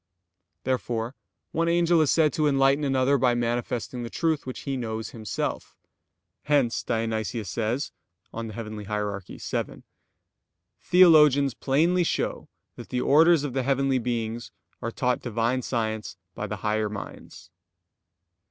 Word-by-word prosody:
Therefore 120 -2 -2 0.4
one 165 +1 0
angel 170 -1 +3
is 150 - +2
said 155 -4 +3
to 155 -1 +1
enlighten 135 +1 +3
another 135 0 +2
by 125 -2 +3
manifesting 120 +1 -2
the 120 - -5
truth 160 -2 -1
which 130 - -6
he 135 -1 -3
knows 110 -3 -4
himself. 110 -4 -4 0.7
Hence 135 -6 +2
Dionysius 110 -1 -2
says 120 +5 -2 0.4
(Coel. 115 0 -5
Hier. 115 +2 -6 0.6
vii): - - -5 1.0
"Theologians 150 -7 +6
plainly 165 +7 +2
show - - -2 0.3
that - - -10
the 125 - -1
orders 160 +2 +5
of 140 -4 -3
the 135 - 0
heavenly 135 0 +1
beings 115 -1 -3 0.3
are 115 - -2
taught 125 +1 0
Divine 120 +2 0
science 110 -4 -3 0.2
by 105 - -4
the 105 0 -4
higher 105 0 +1
minds." 105 -1 -9
125 Hz, 130 wpm, -26 LUFS, 115-145 Hz, 1.0 s, Theologians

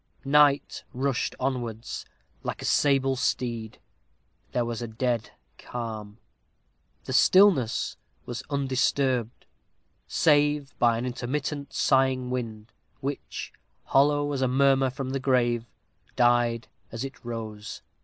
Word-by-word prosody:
Night 145 0 +3
rushed 135 0 -1
onwards, 120 -4 -3 0.3
like - - -5
a - - -3
sable 135 -2 +3
steed. 115 -3 -2 0.7
There 120 -1 0
was 115 0 -4
a 120 - -3
dead 115 0 -1 0.3
calm. 110 -3 -6 0.9
The - - -5
stillness 185 - +4 0.3
was 120 - -5
undisturbed, 130 -3 0 0.6
save 145 -2 +2
by 120 -1 +4
an 120 - -3
intermittent, 140 +3 -3
sighing 130 -2 +2
wind, 115 -3 -4 0.3
which, 140 +1 -5 0.3
hollow 145 +1 +3
as 135 - -2
a 130 - +3
murmur 135 +1 +3
from 130 0 -5
the 135 - -1
grave, 120 -3 +1 0.5
died 120 -1 +2 0.2
as 115 +2 -4
it 135 - -9
rose. 110 -3 -6
125 Hz, 115 wpm, -27 LUFS, 120-140 Hz, 0.9 s, stillness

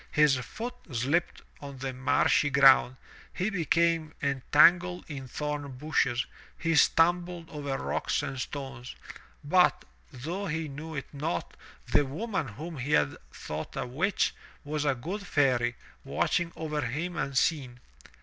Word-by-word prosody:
His 150 -3 +5
foot 225 - -5 0.2
slipped 135 +8 0 0.2
on 140 -1 -8
the 135 0 -4
marshy 130 +3 +2
ground., 135 -2 +6 0.4
he 190 +4 -1
became 165 -3 +1
entangled 170 +6 +4
in 135 -4 -7
thorn 145 +1 -4
bushes, 130 -4 +1 0.3
he 165 -1 0
stumbled 175 +1 +3
over 145 -3 -3
rocks - - -1
and 140 -2 -4
stones. 135 -3 -6 0.5
But, 180 +5 +3 0.3
though 165 +10 -4
he 160 -1 -2
knew 155 +3 -7
it 140 - -6
not, 140 - -3 0.3
the - - +3
woman 190 - -3
whom 150 +8 -7
he 135 +4 -2
had 75 -2 +3 0.2
thought - - -6
a - - -2
witch, 155 +11 0 0.3
was 150 0 -2
a 140 -2 +2
good 175 +12 -5
fairy, 125 -4 +2 0.3
watching 175 -1 0
over 155 -2 -3
him 160 +8 -3
unseen. 135 -3 0
150 Hz, 135 wpm, -29 LUFS, 135-165 Hz, 0.5 s, ground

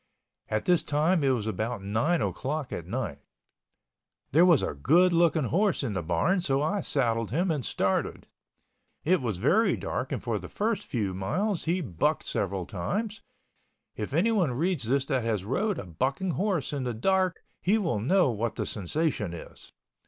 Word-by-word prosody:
At 110 0 -1
this 180 -2 +4
time 155 +3 +1
it 135 - +3
was 120 -5 0
about 110 -1 -3
nine 115 - +1
o'clock 145 0 -3
at - - -5
night. - - -3 1.1
There 165 +6 +6
was 170 -6 +5
a - - -1
good 170 - +4
looking 165 -2 +3
horse 185 - +1
in 115 -6 -2
the 95 - -1
barn, 90 - +1
so 135 -5 +1
I 190 +8 0
saddled 115 -7 0
him 170 - +1
and 145 -5 -1
started. 95 -3 -1 0.8
It 180 0 +3
was 115 -7 -2
very 180 - +3
dark - - -3
and - - -1
for - - -1
the - - -9
first 220 +1 -1
few 105 -8 -1
miles 180 - -1
he 175 +3 +1
bucked 90 - 0
several 95 -3 -2
times 205 - -3 0.7
(if 105 - -4
anyone 180 - +2
reads 150 -3 -1
this 135 +1 +2
that 135 -3 0
has 110 -4 -1
rode 195 - 0
a - - -5
bucking 135 - -1
horse 185 -7 -1
in 140 -2 -2
the 120 -2 -2
dark 185 - +1 0.2
he 200 +5 +3
will 165 - 0
know 155 - +3
what 115 0 -2
the - - -2
sensation 105 - -1
is). 85 - -12
140 Hz, 175 wpm, -28 LUFS, 110-180 Hz, 1.1 s, There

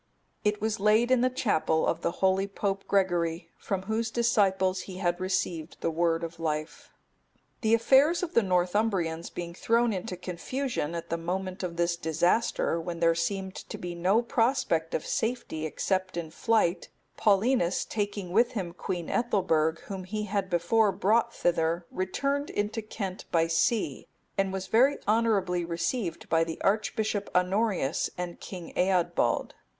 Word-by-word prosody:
It 210 -1 +1
was 220 0 -1
laid 215 +4 +3
in 255 -2 +4
the 255 - +3
chapel 180 -10 +1
of 165 - 0
the - - +1 0.2
holy 190 +1 +2
Pope 195 0 -2
Gregory, 175 -3 0
from 190 -2 -3
whose 220 +3 -1
disciples 195 -5 +2
he 185 - -7
had 175 -2 0
received 175 -3 -2
the 165 - 0
word 165 0 +1
of 165 0 -6
life.(274) 155 -1 -7
The 220 -1 +2
affairs 275 +9 +4
of 355 -1 -3
the 235 - +5
Northumbrians 180 -3 0
being 170 -1 -6
thrown 230 +4 +2
into 185 0 -4
confusion 180 - -3
at 170 - -6
the 170 - -1
moment 185 +2 -3
of 175 -2 -4
this 170 0 +1
disaster, 170 +2 +1
when 170 0 -5
there 165 0 +4
seemed 190 +3 -2
to - - -8
be 175 -1 -5
no 185 +7 +2
prospect 225 -10 +1
of 155 - -2
safety 225 -9 -2
except 185 +3 -1
in 165 -2 -4
flight, 215 -3 +1 0.3
Paulinus, 205 -2 +2
taking 205 -4 -3
with 235 +5 +3
him 185 -7 -3
Queen 175 -1 -4
Ethelberg, 165 -9 +1
whom 190 -2 -7
he 210 +3 -3
had 200 -2 -2
before 200 +5 +3
brought 220 +5 +2
thither, 170 -3 0
returned 275 +10 -1
into 210 +2 -2
Kent 200 -3 -6
by 165 -1 +3
sea, 165 - 0 0.3
and 195 -1 +1
was 190 0 -3
very 260 +8 +4
honourably 205 -5 +2
received 170 +2 -2
by 165 0 +3
the 165 -1 -5
Archbishop 210 0 0
Honorius 180 -4 +1
and 175 -1 -5
King 180 -4 -8
Eadbald. 180 -1 +1
190 Hz, 155 wpm, -28 LUFS, 170-220 Hz, 0.3 s, the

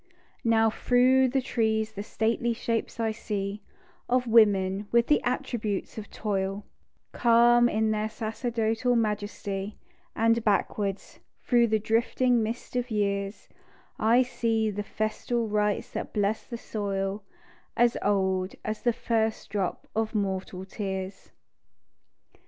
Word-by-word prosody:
Now 225 -1 +3
through 255 +3 +4
the 265 +1 0
trees 220 -3 0
the 200 - -6
stately 230 +2 0
shapes 230 0 -3
I 225 -1 +1
see 205 -1 -4 0.5
Of 250 0 +2
women 205 -3 +3
with 235 0 +4
the 295 - +3
attributes 220 -5 -2
of 215 -1 -7
toil, 195 -1 -2 0.5
Calm 240 0 +5
in 220 0 +1
their 215 0 -1
sacerdotal 225 +1 -1
majesty; 205 -2 -2 0.4
And 230 +1 +2
backward, 200 -1 +1 0.5
through 240 -2 +4
the 220 0 +2
drifting 230 +3 +1
mist 225 +3 -4
of 245 0 -1
years, 200 -1 -2 0.5
I 235 +4 +4
see 225 -3 0
the 205 +1 -3
festal 220 +3 -2
rites 210 -1 0
that - - -5
blessed 205 +1 -1
the 235 - -4
soil, 200 -2 -3 0.5
As 240 0 +4
old 190 -2 0
as 215 0 -3
the 240 - +2
first 220 -1 -1
drop 195 -3 -2
of 220 0 -1
mortal 190 -2 -2
tears. 190 -1 -5
220 Hz, 125 wpm, -27 LUFS, 205-235 Hz, 0.5 s, Calm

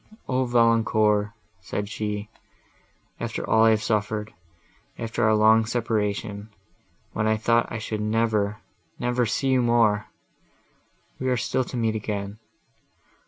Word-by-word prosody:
"O, 130 0 +1
Valancourt!" 110 -3 +3 0.3
said 100 +3 -4
she, 105 0 -4 0.9
"after - - -4
all 110 0 +4
I - - +6
have 110 -1 +2
suffered; 105 0 -1 0.6
after 115 +1 -2
our 110 0 +4
long, 110 +1 +6
long 115 - +1
separation, 105 -2 -2 0.6
when 105 - 0
I 110 0 +2
thought 115 +2 +1
I 120 - -3
should 110 -1 -4
never—never 110 +3 -1
see 135 +5 -1
you 130 -1 +3
more—we 115 +2 -3
are 125 - +1
still 130 +3 0
to 125 - -6
meet 115 -2 +1
again! 105 -1 -4
110 Hz, 125 wpm, -25 LUFS, 105-115 Hz, 0.9 s, I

